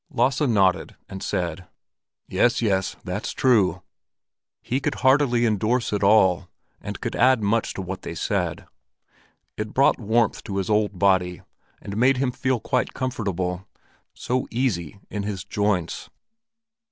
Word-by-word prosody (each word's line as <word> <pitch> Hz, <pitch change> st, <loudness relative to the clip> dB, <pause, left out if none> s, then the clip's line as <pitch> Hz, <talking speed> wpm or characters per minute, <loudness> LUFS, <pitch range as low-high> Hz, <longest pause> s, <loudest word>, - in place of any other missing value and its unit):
Lasse 130 Hz, 0 st, +1 dB
nodded 100 Hz, -9 st, +2 dB
and 95 Hz, -1 st, -8 dB
said: 90 Hz, +1 st, -3 dB, 0.6 s
"Yes, 120 Hz, -, +2 dB
yes, 95 Hz, -4 st, 0 dB
that's -, -, -4 dB
true." 100 Hz, -9 st, +2 dB, 0.8 s
He 130 Hz, -, -1 dB
could 135 Hz, -, -2 dB
heartily 130 Hz, -3 st, +4 dB
endorse 110 Hz, +2 st, 0 dB
it 105 Hz, -, 0 dB
all, 95 Hz, -3 st, +4 dB, 0.3 s
and -, -, -6 dB
could -, -, -4 dB
add 130 Hz, -4 st, +4 dB
much 110 Hz, +2 st, 0 dB
to 95 Hz, -, -4 dB
what 95 Hz, +1 st, -6 dB
they 85 Hz, -, -6 dB
said. -, -, -2 dB, 0.9 s
It 105 Hz, 0 st, -5 dB
brought 135 Hz, -, +4 dB
warmth 115 Hz, 0 st, +1 dB
to 100 Hz, -, -4 dB
his 95 Hz, +2 st, -1 dB
old 105 Hz, -2 st, +1 dB
body, 90 Hz, -2 st, +2 dB, 0.4 s
and 100 Hz, -, -7 dB
made 130 Hz, +3 st, +4 dB
him 130 Hz, -1 st, 0 dB
feel 130 Hz, -1 st, -1 dB
quite 125 Hz, +3 st, -1 dB
comfortable—so 100 Hz, +1 st, -4 dB
easy 105 Hz, -, -2 dB
in 105 Hz, -, -3 dB
his 100 Hz, -2 st, -4 dB
joints. 100 Hz, -4 st, -1 dB
105 Hz, 140 wpm, -24 LUFS, 95-125 Hz, 0.9 s, heartily